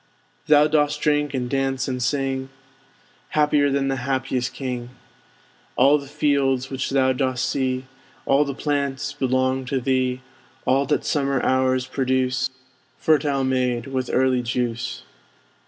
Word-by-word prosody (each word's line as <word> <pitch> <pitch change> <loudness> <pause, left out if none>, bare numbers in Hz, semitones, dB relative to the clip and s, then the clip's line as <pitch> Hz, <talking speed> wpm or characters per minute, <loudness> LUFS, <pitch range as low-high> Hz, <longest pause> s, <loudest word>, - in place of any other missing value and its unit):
Thou 150 0 +6
dost 150 -1 +1
drink, 150 -2 +1
and 125 -1 -2
dance, 135 0 -1
and 130 -1 -3
sing; 135 +1 -1 0.9
Happier 150 -1 +3
than 135 0 0
the 135 0 -1
happiest 130 -1 -1
king! 125 -3 -5 0.9
All 140 +4 +5
the 140 - -10
fields 140 -3 +1
which 135 0 -2
thou 130 -1 +2
dost 130 0 -1
see, 130 -1 -1 0.4
All 140 +2 +4
the 140 -2 -4
plants, 145 -1 -2
belong 130 -1 0
to 135 0 -1
thee; 130 0 0 0.4
All 135 +1 +2
that 145 - 0
summer 140 -2 +1
hours 130 0 +2
produce, 130 0 0 0.5
Fertile 145 -3 +2
made 125 -2 0
with 130 -2 -3
early 130 -1 +2
juice. 120 0 -3
130 Hz, 135 wpm, -23 LUFS, 130-140 Hz, 0.9 s, Thou